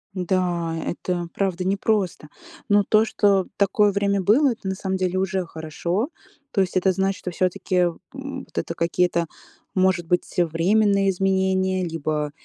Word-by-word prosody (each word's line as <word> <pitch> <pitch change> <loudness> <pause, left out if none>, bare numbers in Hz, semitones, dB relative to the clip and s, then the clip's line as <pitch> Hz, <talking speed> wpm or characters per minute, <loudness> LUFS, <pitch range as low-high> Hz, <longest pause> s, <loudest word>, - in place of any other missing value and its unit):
Да, 175 -2 -1
это 175 0 -3
правда 190 -2 -1
непросто. 195 -5 0 0.4
Но 205 0 +5
то, 215 +3 +4
что 200 -4 +2
такое 200 +1 +3
время 200 0 +1
было, 250 +9 +4
это 220 -4 -7
на 190 - -1
самом 190 0 -2
деле 185 0 -1
уже 190 0 0
хорошо. 170 - -3 0.4
То 195 - +2
есть 185 0 0
это 185 +1 +3
значит, 190 +1 0
что 180 - -5
всё-таки, 185 +1 -1 0.4
м, 275 0 -6
вот - - -22
это - - -2
какие-то, 170 0 +1 0.5
может 185 -2 +2
быть, 180 +3 -1
временные 195 +4 +3
изменения, 190 0 +1
либо, 155 -3 -2
190 Hz, 150 wpm, -23 LUFS, 175-200 Hz, 0.5 s, Но